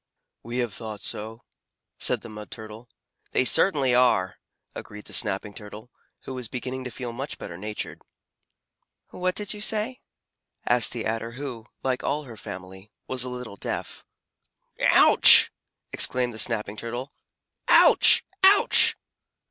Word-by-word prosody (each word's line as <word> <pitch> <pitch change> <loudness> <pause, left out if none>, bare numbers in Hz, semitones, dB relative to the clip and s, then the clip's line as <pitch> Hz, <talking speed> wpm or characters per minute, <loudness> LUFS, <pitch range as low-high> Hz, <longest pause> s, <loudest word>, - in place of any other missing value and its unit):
"We 120 +1 -7
have 120 -5 -2
thought 110 -2 -8
so," 110 +4 -6 0.6
said - - -1
the - - -11
Mud 105 -1 -10
Turtle. 110 +2 -11 0.4
"They 130 - +2
certainly 140 -5 +3
are," 120 -7 +2 0.3
agreed 105 0 -10
the - - -10
Snapping 105 -1 -1
Turtle, 105 +4 -11 0.3
who 130 - -8
was 125 -2 -7
beginning 130 +2 -6
to - - -4
feel 120 0 -7
much 135 +5 -6
better 85 - -9
natured. 105 +4 -7 1.1
"What 185 0 -3
did 210 -1 -2
you 210 - -9
say?" 220 +4 0 0.6
asked 120 -1 +2
the 120 - -5
Adder 115 +1 -4
who, 125 -4 -8 0.2
like 130 -1 -2
all 150 +2 -2
her 120 -5 -11
family, 95 +1 -10 0.2
was 130 -1 -2
a 125 - -5
little 125 -5 -8
deaf. - - -6 0.8
"Ouch!" - - +7 0.4
exclaimed 125 -1 +2
the 110 - -7
Snapping 105 -3 -1
Turtle. 120 +5 -6 0.5
"Ouch! - - +6 0.2
Ouch!" 395 +2 +5
120 Hz, 140 wpm, -24 LUFS, 105-130 Hz, 1.1 s, Ouch